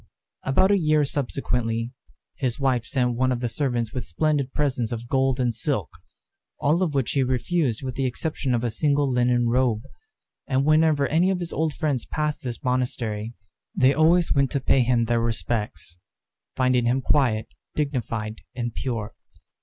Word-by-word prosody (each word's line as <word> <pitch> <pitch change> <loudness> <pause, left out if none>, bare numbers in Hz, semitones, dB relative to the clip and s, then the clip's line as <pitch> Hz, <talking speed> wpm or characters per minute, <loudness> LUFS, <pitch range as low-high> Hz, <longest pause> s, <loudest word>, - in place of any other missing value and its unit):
About 190 +9 +3
a 200 - +4
year 155 -2 +3
subsequently, 120 -4 -2 0.4
his 130 -3 -2
wife 130 -4 +1
sent 125 -2 +1
one 130 +2 +1
of 125 - -1
the 120 - -1
servants 120 -3 -1
with 125 - -3
splendid 140 - 0
presents 130 -6 -1
of 120 0 -5
gold 135 0 +1
and 125 -2 +1
silk, 115 - -2 0.7
all 155 +5 +2
of 165 -6 0
which 135 -3 +1
he 140 - +1
refused 130 0 0
with 130 -1 -3
the 135 +1 0
exception 135 0 -2
of 120 - -1
a 120 - 0
single 145 +4 +1
linen 125 -1 +2
robe. 120 -2 +1 0.6
And 135 -1 +1
whenever 155 -2 +4
any 170 +4 +3
of 190 -2 0
his 175 -1 -4
old 160 -2 -1
friends 145 -7 -1
passed 150 -1 -2
this 120 -2 -5
monastery, 120 -3 -2 0.4
they 130 +2 +4
always 165 +4 +4
went 140 -2 +2
to 140 - +1
pay 130 0 +3
him 120 -1 +2
their 115 0 +1
respects, 105 -7 -2 0.6
finding 130 -2 +2
him 125 +3 +2
quiet, 120 -6 +1 0.3
dignified, 115 -7 -2
and 120 -2 -3
pure. 115 -5 -3
130 Hz, 170 wpm, -24 LUFS, 120-145 Hz, 0.7 s, a